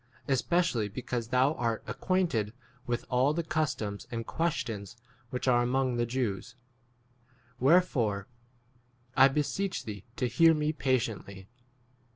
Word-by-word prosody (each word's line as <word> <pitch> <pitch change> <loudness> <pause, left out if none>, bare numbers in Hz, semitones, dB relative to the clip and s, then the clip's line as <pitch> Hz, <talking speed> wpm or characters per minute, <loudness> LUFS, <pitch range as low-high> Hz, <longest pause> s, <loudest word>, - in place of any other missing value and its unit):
3 140 - +1
especially 130 -4 +1
because 120 +1 -4
thou 130 +4 +3
art 115 -5 -1
ac - - -5
quainted 165 - +1 0.3
with 120 0 -2
all 130 +4 +3
the 170 - 0
customs 155 -10 -2
and 115 -1 -4
questions 115 - -2 0.3
which 125 +2 -3
are 120 -1 +5
among 125 0 +1
the 120 0 +1
Jews; 120 -6 -2 1.0
wherefore 130 - +3 0.9
I 135 - +8
beseech 150 +4 -1
thee 105 -3 -6
to 125 - 0
4 120 - -9
hear 165 +3 +7
me 150 0 0
patiently. 115 -8 -2
125 Hz, 135 wpm, -30 LUFS, 115-150 Hz, 1.0 s, I